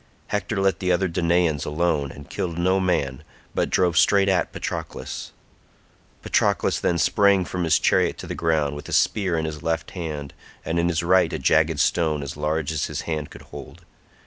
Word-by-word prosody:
Hector 105 +1 -2
let 95 0 +1
the 90 -1 0
other 95 +2 +2
Danaans 85 -3 +1
alone 75 -2 0
and 70 0 -12
killed 85 -2 -4
no 95 +2 +2
man, 75 -8 0 0.3
but - - 0
drove 90 -2 +2
straight 100 -1 +4
at 95 -2 +1
Patroclus. - - -5 0.9
Patroclus - - +1
then 85 - +1
sprang 100 +1 +3
from 90 0 -3
his 80 - +4
chariot - - +2
to - - -8
the - - -5
ground, 80 -3 0
with 75 - -8
a - - -5
spear 95 -5 +2
in 80 - -1
his 80 -1 -5
left 80 0 -2
hand, 75 -6 -5 0.3
and 85 +1 0
in 85 - +2
his 85 -1 0
right 90 -1 +3
a - - -2
jagged 80 -1 +2
stone 80 -3 +1
as 70 - -6
large 80 0 -1
as 80 -2 -1
his - - -4
hand 75 -3 -4
could - - -12
hold. - - -10
85 Hz, 190 wpm, -23 LUFS, 75-90 Hz, 0.9 s, straight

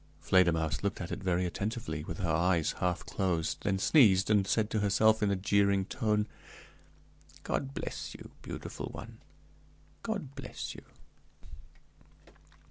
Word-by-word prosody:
Fledermausse 80 -6 +2
looked 100 - -2
at 85 - -5
it - - -4
very 90 -1 +1
attentively, 90 -4 -3
with 80 +2 -6
her 90 -5 -1
eyes 85 -1 +2
half 90 -1 -1
closed; 90 -5 -1
then 95 -1 0
sneezed, 100 -4 +5
and 100 -2 +3
said 110 0 +1
to 110 - +1
herself, 110 +2 +3
in 105 - +2
a 100 - +2
jeering 100 0 +2
tone, 105 -2 0 1.2
"God 135 +1 -2
bless - - -5
you, - - -11
beautiful - - -6
one; - - -9 0.8
God 200 - -4
bless 135 -3 -6
you!" - - -10
100 Hz, 135 wpm, -31 LUFS, 90-110 Hz, 1.2 s, sneezed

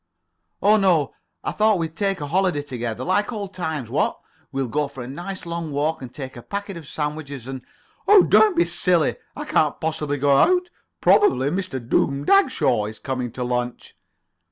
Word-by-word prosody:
"Oh, 210 +2 +6
no. 175 -8 +2 0.3
I - - -2
thought 215 -1 +3
we'd 165 -1 -3
take 195 -3 0
a - - -2
holiday 180 -4 +1
together. 120 -3 -4
Like 205 - +1
old 200 -4 -5
times, 160 -8 -3
what? - - 0 0.3
We'll 135 -1 -2
go 150 +4 -1
for 135 -3 -8
a - - -8
nice 175 +8 -7
long 170 -2 -4
walk, 150 +2 -1
and 125 -2 -8
take 130 -2 -7
a 120 - -9
packet 200 - -5
of 165 -4 -9
sandwiches 150 -4 -4
and——" 130 0 -6 0.5
"Oh, 405 -2 +8
don't 425 -4 +5
be 345 - +4
silly. 175 -5 +1 0.2
I - - -5
can't - - +1
possibly 150 -2 -2
go 140 0 +3
out. 360 - +3 0.3
Probably 375 - +4
Mr. 185 -7 -3
Doom 140 +3 +1
Dagshaw 260 - +3
is 110 0 -8
coming 125 +1 -4
to 125 - -4
lunch." 125 0 -3
155 Hz, 180 wpm, -23 LUFS, 135-195 Hz, 0.5 s, Oh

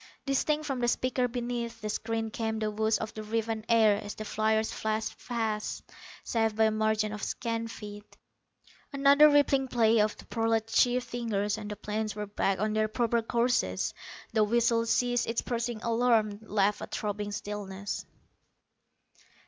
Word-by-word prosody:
Distinct 300 +2 +1
from 270 -3 -2
the 240 - +1
speaker 250 +1 +1
beneath 240 -1 -4
the 215 - -5
screen 225 +1 -2
came 220 0 -2
the 215 -1 -1
whoosh 220 0 +1
of 220 - -5
the 215 - -6
riven 220 0 -2
air 220 -3 +4
as 205 - -6
the 215 - -6
fliers 220 +1 +1
flashed 220 0 -2
past, 220 -3 -2 0.4
safe 225 -2 0
by 220 - +3
a 220 - +4
margin 215 0 +1
of 210 - -6
scant 230 +1 -3
feet. 205 -2 -10 0.7
Another 280 +2 +6
rippling 280 -2 +3
play 230 -2 +3
of 210 0 +1
the - - -13
prolat 225 -1 0
chief's 245 +2 +2
fingers 210 -4 -1
and 215 -1 -7
the 210 - -4
planes 210 0 -3
were 210 0 -3
back 195 -1 0
on 215 +1 0
their 215 0 +2
proper 235 +1 +1
courses. 230 - 0 0.4
The 220 -1 +4
whistle 230 +1 +2
ceased 245 +1 +1
its 230 - -1
piercing 235 -2 -3
alarm, 230 -3 +2
left 205 -1 +1
a - - -5
throbbing 205 0 -3
stillness. 205 -1 -5
220 Hz, 165 wpm, -29 LUFS, 210-235 Hz, 0.7 s, Another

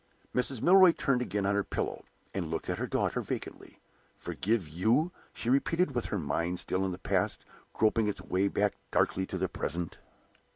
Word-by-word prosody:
Mrs. 125 -1 +2
Milroy 185 -1 +7
turned 130 -6 +1
again 105 -4 -1
on 100 - +2
her 100 0 +1
pillow, - - -4 0.3
and 90 -5 -3
looked 80 0 -2
at - - -3
her - - -2
daughter - - 0
vacantly. - - -6 0.4
"Forgive 105 -4 -1
you?" 110 - +2 0.2
she - - -6
repeated, 140 +5 +2
with 120 -2 -1
her 105 - -2
mind 85 +2 -1
still 95 +1 -1
in 95 - -1
the 90 - -5
past, 95 - -1 0.3
groping 110 0 +2
its 105 - -2
way 95 +2 +1
back 100 +1 +1 0.2
darkly 95 0 +1
to 95 - -4
the 95 +1 0
present. 85 0 -4
100 Hz, 180 wpm, -30 LUFS, 90-125 Hz, 0.4 s, Milroy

